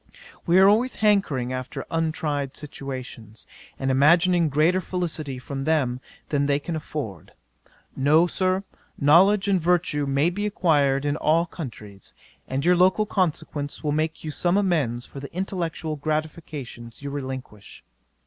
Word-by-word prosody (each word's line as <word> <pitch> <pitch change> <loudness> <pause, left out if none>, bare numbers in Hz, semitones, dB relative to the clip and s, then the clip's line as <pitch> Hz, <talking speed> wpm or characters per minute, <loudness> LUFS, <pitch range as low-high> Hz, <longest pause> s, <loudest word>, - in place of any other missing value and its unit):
We 170 +2 +5
are 190 +1 +7
always 230 +5 +3
hankering 190 - +1
after 130 0 -5
untried 155 -4 -2
situations, 130 -6 -8 0.3
and 135 0 -1
imagining 170 +5 +4
greater 160 +6 +2
felicity 165 -7 -3
from 135 +2 -5
them 135 -5 0 0.3
than 140 -1 +1
they 140 -1 +2
can 160 +3 -5
afford. 140 - -6 0.6
No, 150 +5 +4
Sir, 185 +2 0 0.3
knowledge 190 +8 +5
and 190 -3 +2
virtue 165 -4 +1
may 140 +5 +2
be 205 +3 -2
acquired 145 -8 +2
in 145 +1 0
all 165 +3 +2
countries, 110 - -9 0.3
and 135 +3 -2
your 180 +1 +5
local 185 +4 +3
consequence 155 -7 -2
will 150 - 0
make 155 +2 -1
you 155 - -4
some 175 +6 +1
amends 150 - 0
for 140 - -10
the 140 - -8
intellectual 170 -4 -3
gratifications 150 -5 -5
you 140 - -4
relinquish." 130 -7 -7
155 Hz, 140 wpm, -24 LUFS, 135-175 Hz, 0.6 s, are